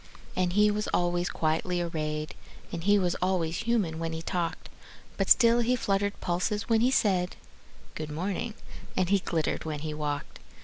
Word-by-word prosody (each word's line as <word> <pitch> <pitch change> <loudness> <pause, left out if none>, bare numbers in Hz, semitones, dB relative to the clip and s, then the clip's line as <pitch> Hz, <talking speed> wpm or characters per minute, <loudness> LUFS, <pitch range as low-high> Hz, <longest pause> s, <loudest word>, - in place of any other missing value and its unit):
And 180 -1 +1
he 210 +1 +5
was 210 +1 -2
always 175 0 +1
quietly 160 +3 0
arrayed, 155 -3 -2 0.4
And 165 -1 -4
he 205 0 +5
was 180 -3 +1
always 180 -3 +1
human 220 -9 0
when 165 0 -2
he 160 0 -5
talked; 170 -1 -2 0.5
But - - -1
still 235 -1 +6
he 240 +1 +2
fluttered 200 -3 0
pulses 180 +5 -1
when 225 -1 +3
he 245 - +4
said, 190 -8 +2 0.6
"Good 155 -1 -5
morning," 195 +8 -3 0.4
and 185 -1 +2
he 200 0 +4
glittered 165 -4 -1
when 150 -2 -4
he 155 -1 -3
walked. 150 -1 -4
180 Hz, 170 wpm, -28 LUFS, 160-205 Hz, 0.6 s, still